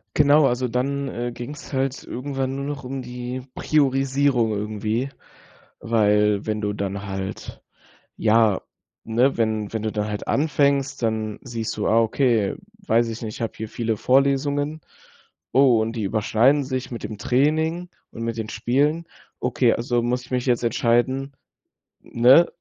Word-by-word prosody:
Genau, 145 +1 +5
also 125 -1 +1
dann, 140 +3 -1
äh, 120 -1 -4
ging's 135 +6 -8
halt 135 0 -1
irgendwann 135 0 -3
nur 140 0 -4
noch 145 0 -5
um 130 +1 -5
die 125 +1 -6
Priorisierung 135 -4 +2
irgendwie, 110 +4 -2 0.7
weil 105 -2 +2
wenn 110 -1 -2
du 105 -1 -1
dann 100 -1 -4
halt 95 0 -6 0.5
ja 110 -2 +3 0.4
ne, 120 +4 +2
wenn 110 -2 0
wenn 110 -1 -2
du 110 -1 -2
dann 105 -1 -2
halt 105 -1 -5
anfängst, 140 -2 +1
dann 110 -2 -1
siehst 115 -4 -4
du: 105 - -2
„Ah, 115 - +4
okay, 115 -2 +1 0.3
weiß 115 +1 +3
ich 115 +1 -6
nicht, 110 -1 -5
ich - - -11
habe 115 - -2
hier 110 - -5
viele 115 0 -2
Vorlesungen. 140 +5 +1 0.7
Oh, 130 -4 +5
und 115 +1 -3
die 110 - -2
überschneiden 115 +7 +2
sich 130 -1 -4
mit 120 - -6
dem 110 - -6
Training 160 +9 +1 0.2
und 115 - -6
mit 115 -1 -3
den 110 -1 -3
Spielen. 150 +7 0 0.3
Okay, - - +2
also 120 0 0
muss 125 +1 -1
ich 125 - -13
mich 125 0 -1
jetzt 120 -1 +1
entscheiden“ 125 +4 +1 0.7
ne, 130 +8 +5
120 Hz, 155 wpm, -23 LUFS, 110-135 Hz, 0.7 s, Genau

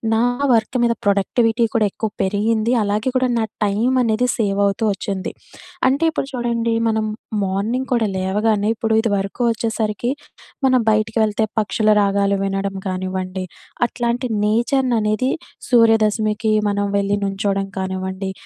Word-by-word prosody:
నా 225 - +2 0.3
వర్క్ 230 +2 +1
మీద 235 - +2
ప్రొడక్టివిటీ 225 +4 +2
కూడా 220 -2 +3
ఎక్కువ 220 -2 -3
పెరిగింది. 215 +4 +1
అలాగే 210 +5 0
కూడా 255 -1 +1
నా 220 - +1 0.2
టైమనేది 240 +3 +1
సేవ్ 205 -2 0
అవుతూ 200 +3 -2
వచ్చింది. 195 0 -4 0.6
అంటే 280 +5 0
ఇప్పుడు - - -3
చూడండి, 235 -2 -1
మనం 220 -1 0 0.4
మార్నింగ్ 215 +7 -1
కూడా 230 -3 +2
లేవగానే 205 +2 +1
ఇప్పుడు 225 0 -1
ఇది 225 0 +1
వరకు 195 +5 -4
వచ్చేసరికి 225 +1 -2 0.6
మనం 255 -1 +4
బయటికి 215 +1 +1
వెళ్తే 215 +1 0 0.2
పక్షుల 215 0 +1
రాగాలు 200 0 +2
వినడం 195 0 -2
కానివ్వండి, 185 0 -3 0.4
అట్లాంటి 240 +1 -2 0.2
నేచర్‌ని 240 +4 +1
అనేది 215 +4 0 0.4
సూర్యదశమికి, 220 -2 +3 0.2
మనం 205 0 0
వెళ్లి 200 0 +1
నుంచోవడం 195 0 -1
కానివ్వండి, 190 0 -3
215 Hz, 130 wpm, -20 LUFS, 200-235 Hz, 0.6 s, మనం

